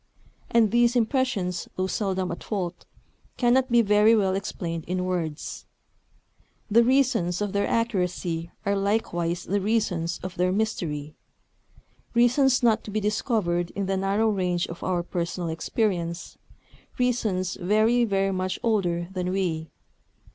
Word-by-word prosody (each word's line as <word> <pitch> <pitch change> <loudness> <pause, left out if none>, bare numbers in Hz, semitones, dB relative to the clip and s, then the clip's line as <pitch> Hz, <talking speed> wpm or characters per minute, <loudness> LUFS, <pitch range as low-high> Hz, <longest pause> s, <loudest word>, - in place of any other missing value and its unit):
And 225 -3 +3
these 240 +1 +3
impressions, 225 -7 0
though 185 - 0
seldom 190 -2 -1
at 170 - -6
fault, 180 -4 -4 0.5
cannot 255 +1 +3
be 235 -1 +5
very 210 +2 +5
well 195 -3 +2
explained 175 -4 -4
in 180 +1 -2
words. 170 -4 -4 1.0
The 235 +3 +6
reasons 235 -9 +2
of 205 -2 -2
their 200 0 +1
accuracy 180 -6 -1 0.2
are 200 0 +1
likewise 180 -4 -1
the 200 +1 -1
reasons 185 -6 0
of 185 -1 -6
their 180 +1 +2
mystery, 165 -8 -2 1.0
reasons 255 +2 +4
not 225 -2 +3
to - - -7
be 215 +1 -1
discovered 205 -5 0
in 200 0 -1
the 195 +1 0
narrow 195 +3 +1
range 180 -4 0
of 170 - -9
our 180 -2 0
personal 175 0 -3
experience, 170 0 -2 0.6
reasons 220 -8 0
very, 215 +6 +3
very 195 -3 +1
much 185 0 -2
older 175 -7 0
than 180 -1 -2
we. 175 -4 -1
195 Hz, 135 wpm, -25 LUFS, 175-220 Hz, 1.0 s, The